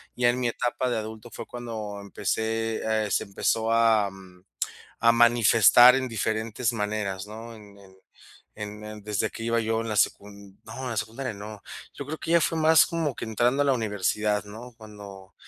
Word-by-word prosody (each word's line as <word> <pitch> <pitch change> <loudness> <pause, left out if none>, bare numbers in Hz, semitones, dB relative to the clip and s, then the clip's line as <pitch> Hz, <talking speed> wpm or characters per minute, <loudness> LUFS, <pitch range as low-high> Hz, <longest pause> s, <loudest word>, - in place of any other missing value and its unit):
ya 120 -1 +3
en 125 - +1
mi 120 - +1
etapa 125 +2 -2
de 120 - -1
adulto 110 +1 -7
fue - - -7
cuando 110 -4 -6
empecé, 110 +2 -2 0.2
eh, - - -4
se - - +1
empezó 110 +3 -1
a, 110 -3 +3
mm, 95 -1 -16 0.6
a 115 0 +6
manifestar 120 +1 +6
en 130 -1 -1
diferentes 110 +2 -1
maneras, 105 -3 -3
¿no? 115 +2 -9
En 100 -2 -15
en 95 -1 -18 0.6
en 105 0 -7
en 105 0 -9
desde 105 +1 -1
que 115 - -8
iba 115 0 +1
yo 110 0 -1
en 115 - -5
la 105 - -2
secun 100 -1 -2
no, 110 - -10
en 125 - -3
la 115 - -4
secundaria 115 +3 -4
no, 105 0 -9 0.3
yo 140 - -7
creo 155 +2 -5
que 160 +2 -5
ya 170 - +5
fue 165 - 0
más 160 -1 +6
como 165 -6 -2
que - - -7
entrando 120 +5 +1
a - - +2
la 140 - +3
universidad, 105 -1 -1
¿no?, 115 +4 -11
cuando 100 -3 -12
110 Hz, 195 wpm, -26 LUFS, 105-120 Hz, 0.6 s, a